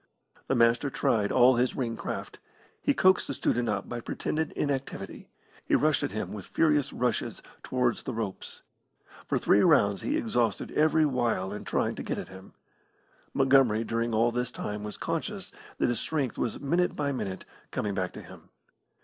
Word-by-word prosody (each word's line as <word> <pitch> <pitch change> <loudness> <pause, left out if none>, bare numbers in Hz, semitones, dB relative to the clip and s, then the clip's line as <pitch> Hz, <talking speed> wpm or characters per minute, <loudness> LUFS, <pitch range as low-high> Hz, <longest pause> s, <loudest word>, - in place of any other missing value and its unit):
The 135 - +1
Master 120 +3 +3
tried 105 -5 +1
all 125 0 +6
his 125 +1 +1
ring 115 -3 -2
craft. - - -6 0.4
He - - +2
coaxed 185 0 +4
the 140 - -3
student 120 -1 0
up 100 -1 -2
by 120 - -4
pretended 155 +6 -2
inactivity; 140 -2 -4 0.3
he - - +2
rushed 155 -2 +3
at - - -1
him 105 +1 -4
with 100 -3 -8
furious 150 -4 +2
rushes 125 -3 -2 0.2
towards 125 -2 0
the - - -5
ropes. 105 -4 -5 0.6
For - - +1
three 100 - +4
rounds 105 - +4
he 295 - 0
exhausted 120 - 0
every 155 +1 +3
wile 120 -8 0
in 105 - -7
trying - - 0
to - - -6
get - - -3
at - - -6
him. 95 0 -13 0.8
Montgomery 130 -5 +4
during 115 +1 -1
all 115 +2 +3
this 125 +1 -1
time 105 -3 -5
was 105 0 -6
conscious - - -4 0.3
that - - +2
his 120 - 0
strength 145 -6 -1
was 120 - -2
minute 170 +6 +1
by 145 -1 -1
minute 95 -8 -4 0.2
coming 105 -1 -2
back 95 -2 -2
to - - -9
him. - - -14
120 Hz, 175 wpm, -28 LUFS, 105-140 Hz, 0.8 s, all